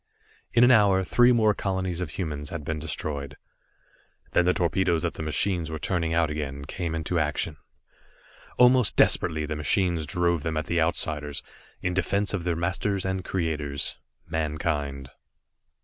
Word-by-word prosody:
In 120 - +4
an 125 - +7
hour, 100 -5 +5
three 120 +6 +4
more 110 -3 +4
colonies 95 -3 -2
of 90 - -3
humans 75 -4 -4
had 85 -3 -5
been 80 0 -2
destroyed. 75 -2 -4 0.9
Then 90 - +3
the 90 - +4
torpedoes 85 -1 +1
that - - -1
the - - -7
machines 80 +2 -1
were 80 - -4
turning 85 0 -1
out 80 -2 +2
again, 70 -2 -4
came 85 +2 -4
into 80 +2 -1
action. 75 0 -1 1.0
Almost 125 -3 +5
desperately 80 -1 +3
the 75 +1 -3
machines 80 +1 0
drove 85 -2 +1
them 80 +1 -2
at 80 - -1
the 85 -1 0
Outsiders 75 -3 -1 0.4
in 90 - 0
defense 100 +2 0
of 90 -4 -2
their 85 -2 0
masters 95 +3 -1
and 95 -1 -2
creators, 75 -7 -2 0.3
Mankind. 75 -4 -2
85 Hz, 155 wpm, -26 LUFS, 75-95 Hz, 1.0 s, an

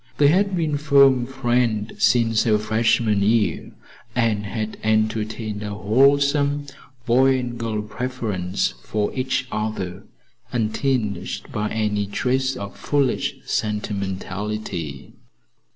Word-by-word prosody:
They 145 -1 +5
had 195 +4 +2
been 155 -4 0
firm 140 -4 +5
friends 120 -4 0
since 115 -2 +4
her 110 -2 +4
freshman 110 -1 +2
year, 110 +1 +1 0.4
and 110 -4 +1
had 110 +1 -4
entertained 110 0 -1
a 105 -1 -4
wholesome, 140 +6 +3 0.4
boy 130 +2 +4
and 125 -2 -4
girl 110 -2 -3
preference 105 -6 -2
for 105 -1 -1
each 130 0 -1
other 105 -4 -3 0.5
untinged 110 -3 -1
by 105 0 -2
any 105 -2 -1
trace 130 +5 0
of 100 -4 -7
foolish 140 -4 0
sentimentality. 100 -6 -3
110 Hz, 105 wpm, -22 LUFS, 105-130 Hz, 0.5 s, They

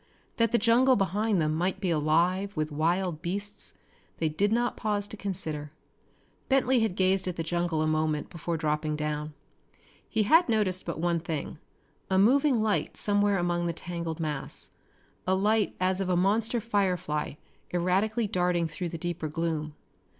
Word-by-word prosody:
That 230 -1 +3
the 240 - +4
jungle 245 +3 +4
behind 205 0 +1
them 155 -1 +1
might 180 +4 -1
be 190 -3 0
alive 170 +5 +1
with 155 0 -1
wild 165 +2 0
beasts 200 +4 -4 0.4
they 160 - 0
did 200 +7 0
not 240 +2 +1
pause 205 -2 -1
to - - -6
consider. 160 -8 -4 0.8
Bentley 265 -2 +3
had 220 -5 0
gazed 190 0 +2
at 180 - -2
the 165 - -3
jungle 170 -1 0
a - - +1
moment 155 -1 0
before 170 -1 -3
dropping 155 0 -1
down. 150 0 -3 0.7
He 220 -2 +1
had 325 - +5
noticed 195 -5 +1
but 170 - -3
one 170 0 +1
thing 160 -1 -5 0.5
a 190 - +2
moving 255 +3 +4
light 215 -2 0
somewhere 205 -1 +2
among 175 -1 0
the 170 - -1
tangled 170 -1 -5
mass, 150 -4 -5 0.6
a 190 - +3
light 210 +2 +1
as 185 +1 +1
of 190 - -2
a 180 - +2
monster 220 +6 +2
firefly 185 -10 -1 0.4
erratically 195 +6 +1
darting 180 -3 +1
through 170 +3 -4
the 165 - -5
deeper 170 -1 -3
gloom. 155 -1 -3
180 Hz, 165 wpm, -28 LUFS, 160-205 Hz, 0.8 s, had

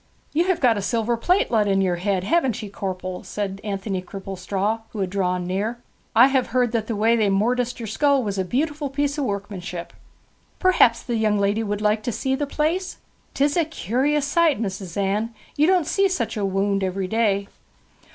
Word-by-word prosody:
'You 335 +4 +2
have 370 -2 +1
got 235 -5 +3
a - - -3
silver 230 +3 0
plate 355 +11 +1
let 215 -3 +3
into 195 -1 +2
yer 175 -2 0
head, 190 0 0
haven't 255 - +1
ye, 205 - -6
corpel?' 185 -2 -4
said 195 -1 -4
Anthony 195 -2 -3
Cripplestraw, 195 +3 -3
who 215 - -7
had 185 -1 -2
drawn 180 -2 0
near. 200 +6 -2 0.4
'I 240 +4 +8
have 265 -2 +1
heard 245 -1 +1
that 225 -2 -1
the 230 - -2
way 225 +3 +3
they 215 -3 +2
morticed 240 +5 +1
yer 230 - -5
skull 275 +5 +2
was 200 -2 -2
a - - +2
beautiful 290 - -1
piece 285 +2 -1
of 285 - 0
workmanship. 195 -4 -5 0.6
Perhaps 360 -11 +4
the 240 -3 -2
young 215 -1 +2
woman 205 +2 +1
would 205 0 -2
like 210 0 +2
to 240 - -2
see 265 +4 -1
the 285 +2 -1
place? 325 +6 -1 0.4
'Tis 285 +1 +2
a 340 - +3
curious 290 - 0
sight, 315 -2 +2
Mis'ess 190 -4 -4
Anne; 210 +4 -1 0.2
you 300 +2 +3
don't 365 -3 +3
see 390 +5 +2
such 260 -12 -2
a - - -3
wownd 195 +1 0
every 190 0 -1
day.' 200 -2 +1
220 Hz, 200 wpm, -23 LUFS, 195-270 Hz, 0.6 s, I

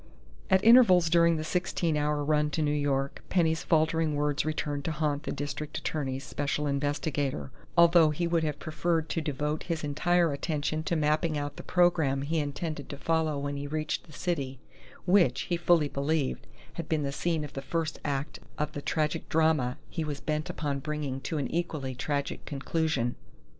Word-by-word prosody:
At 190 +1 +4
intervals 185 -9 +7
during 170 -1 +5
the 155 - -3
sixteen 170 -1 0
hour 150 0 0
run 150 0 +2
to 160 - +1
New 145 - +1
York, 140 -2 -1
Penny's 165 -2 +2
faltering 160 -2 +2
words 145 0 +1
returned 150 -2 -2
to 160 - 0
haunt 150 -2 -1
the - - -2
district 145 +1 -4
attorney's 135 -3 -3
special 145 +3 -2
investigator, 140 - -1 0.3
although 170 -1 +7
he 150 +3 -1
would 170 -1 +1
have 150 -2 -1
preferred 160 +1 -1
to 165 - -1
devote 150 +1 -2
his 165 -3 -3
entire 165 +2 +2
attention 155 +1 -2
to 170 - 0
mapping 155 +1 +1
out 145 0 -3
the - - -7
program 160 -7 +2
he 160 +3 0
intended 145 0 -4
to 140 - -6
follow 160 0 0
when 140 0 -3
he 140 0 -4
reached 155 +1 -2
the - - -15
city 145 -5 -2 0.5
which, 180 -9 +4
he 175 - -1
fully 170 -3 +3
believed, 140 0 -1 0.3
had 170 - -6
been 155 -2 +1
the 140 - -1
scene 160 +2 -1
of 145 - -8
the 135 - -4
first 160 +3 -2
act 140 0 -3 0.2
of 150 0 -1
the 145 - -5
tragic 150 +2 -1
drama 155 -5 +2
he 160 - -3
was 145 -2 -4
bent 155 +1 -2
upon 145 -3 -2
bringing 145 -2 -3
to 155 +4 -3
an 140 - -1
equally 155 -6 -2
tragic 140 +2 -3
conclusion. 140 -3 -1
150 Hz, 180 wpm, -29 LUFS, 145-160 Hz, 0.5 s, intervals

